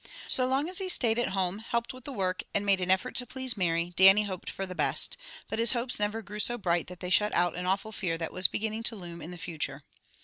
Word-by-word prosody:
So 255 -1 +2
long 270 +4 +1
as 365 +1 -2
he 380 -1 -3
stayed 235 -8 +2
at 240 - 0
home, 190 0 -1
helped 235 +2 -3
with 255 -1 -12
the 285 - -5
work, 185 -6 -1
and 200 - +1
made 195 -2 +2
an 180 - -2
effort 190 0 +2
to 250 - +2
please 260 -2 -2
Mary, 170 -2 -1
Dannie 195 +3 +8
hoped 190 -3 -5
for 195 - -4
the 185 - -7
best, - - +3 0.3
but - - -4
his 230 +1 +3
hopes 245 -1 0
never 210 +2 -1
grew 210 +1 -7
so 240 +3 +1
bright 175 -5 0
that 180 -1 -11
they 180 -1 -4
shut 210 +2 +3
out 175 -1 +2
an 180 +1 -4
awful 195 +4 -1
fear 180 -6 -2
that 165 -1 -5
was 185 -1 +4
beginning 220 +1 -3
to 230 0 +2
loom 170 -4 -9
in 160 - -7
the 180 - -8
future. 150 -4 -5
200 Hz, 265 wpm, -29 LUFS, 180-230 Hz, 0.3 s, Dannie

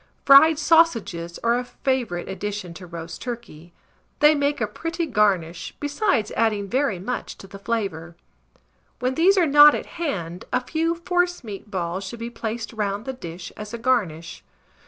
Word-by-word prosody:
Fried 285 +3 +8
sausages 240 - +2
are 235 +1 +2
a - - -3
favourite 245 -8 -2
addition 195 -2 -5
to 180 +1 -11
roast 170 -1 -8
turkey; 225 -10 -8 0.5
they 300 +1 +6
make 285 0 0
a 220 - +1
pretty 330 - -4
garnish, 190 - 0
besides 290 - 0
adding 215 -3 +1
very 260 -2 0
much 220 +8 -5
to - - -12
the 195 +1 -11
flavour. 195 -6 -3 0.8
When 255 +1 -1
these 365 +7 +4
are 360 - +5
not 295 0 +8
at - - -4 0.2
hand, 180 - -3
a 250 - +2
few 330 +3 0
forcemeat 340 - -2
balls 185 -1 -3
should 195 +5 -7
be 230 +1 -6
placed 230 0 -5
round 205 -1 -2
the 265 - -4
dish 175 -7 -8
as 210 +2 -7
a - - -5
garnish. 200 -10 -1
230 Hz, 160 wpm, -23 LUFS, 185-285 Hz, 0.8 s, Fried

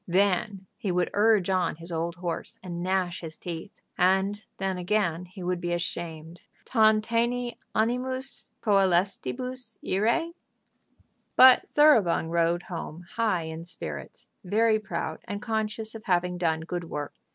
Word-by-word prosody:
Then 190 +1 +1
he 195 - -1
would 180 0 +1
urge 210 -2 +4
on 180 -4 +1
his 170 +2 -9
old 165 +1 -2
horse, 175 -1 -5
and 175 -2 -5
gnash 185 -1 0
his 160 -2 -7
teeth; 165 -2 -8 0.2
and 190 +3 +2
then, 190 -1 -2
again, 180 -2 0
he 185 +1 -10
would 180 0 -1
be 175 0 -1
ashamed. 170 -1 -4 0.2
"Tantaene 230 +2 +2 0.2
animis 255 +4 -1
coelestibus 215 +5 0
irae?" 235 - +1 1.0
But 255 -1 +8
Thoroughbung 225 - +5
rode 170 +1 +2
home 170 -1 -7
high 215 -7 +1
in 160 +1 -6
spirits, 75 - -7 0.2
very 215 +3 +3
proud, 185 -5 -4
and 205 - -4
conscious 220 0 -2
of 220 -1 -9
having 180 -1 +1
done 160 -2 +1
good 175 +1 -4
work. 150 -3 -5
185 Hz, 135 wpm, -27 LUFS, 170-220 Hz, 1.0 s, But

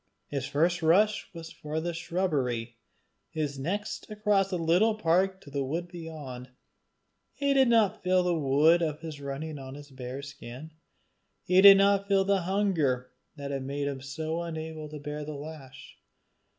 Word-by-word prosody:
His 135 -2 -3
first 170 +4 +1
rush 205 +6 +3
was 165 -2 -9
for 155 +1 -4
the 170 +1 -3
shubbery, 140 -10 -2 0.5
his 145 -3 -3
next 200 +12 -3
across 210 -2 +1
the 185 - -1
little 175 +7 +3
park 190 0 +1
to 140 - -13
the 140 0 -1
wood 165 +6 -3
beyond. 150 -7 -8 0.9
He 280 -1 +1
did 265 -1 +5
not 220 -3 +3
feel 185 0 +3
the 180 -1 +1
wind 155 +3 +4
of 155 -2 -2
his 155 -3 -7
running 140 +2 -5
on 135 0 -8
his 145 0 -12
bare 130 +1 -7
skin. 140 +1 -9 0.7
He 185 +1 +4
did 195 0 +10
not 200 0 +3
feel 195 -1 +3
the 200 -1 +2
hunger 165 -10 0 0.2
that 140 -1 -6
had 135 -1 -2
made 140 +1 -3
him 135 -2 -4
so 160 +4 -4
unable 160 -2 -6
to 150 - -7
bear 150 +1 -5
the 150 0 -6
lash. 145 -2 -10
160 Hz, 165 wpm, -28 LUFS, 140-185 Hz, 0.9 s, did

